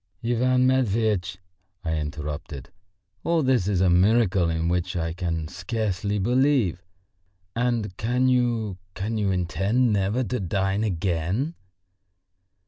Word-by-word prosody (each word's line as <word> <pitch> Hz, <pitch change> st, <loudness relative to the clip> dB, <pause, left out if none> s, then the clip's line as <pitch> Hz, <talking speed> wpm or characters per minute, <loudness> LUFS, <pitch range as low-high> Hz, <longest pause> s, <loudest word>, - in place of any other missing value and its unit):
"Ivan 125 Hz, +2 st, +2 dB
Matveitch," 110 Hz, -8 st, +1 dB, 0.5 s
I 80 Hz, -1 st, 0 dB
interrupted, 75 Hz, -2 st, -5 dB, 0.5 s
"all 165 Hz, -2 st, +2 dB
this 130 Hz, -8 st, +2 dB
is 100 Hz, -3 st, +1 dB
a 95 Hz, -, +4 dB
miracle 95 Hz, -1 st, +3 dB
in 80 Hz, 0 st, -1 dB
which 90 Hz, +1 st, -1 dB
I 80 Hz, -1 st, -1 dB
can 85 Hz, -3 st, -3 dB
scarcely 100 Hz, +3 st, -2 dB
believe. 120 Hz, -, +2 dB, 0.7 s
And 115 Hz, -5 st, -1 dB
can 125 Hz, +4 st, +1 dB
you, 120 Hz, -6 st, +1 dB, 0.2 s
can 110 Hz, +3 st, -2 dB
you 100 Hz, -2 st, +1 dB
intend 95 Hz, +6 st, +1 dB
never 100 Hz, +5 st, +1 dB
to 125 Hz, +3 st, -2 dB
dine 95 Hz, +2 st, 0 dB
again?" 95 Hz, -, -1 dB
100 Hz, 120 wpm, -25 LUFS, 90-120 Hz, 0.7 s, a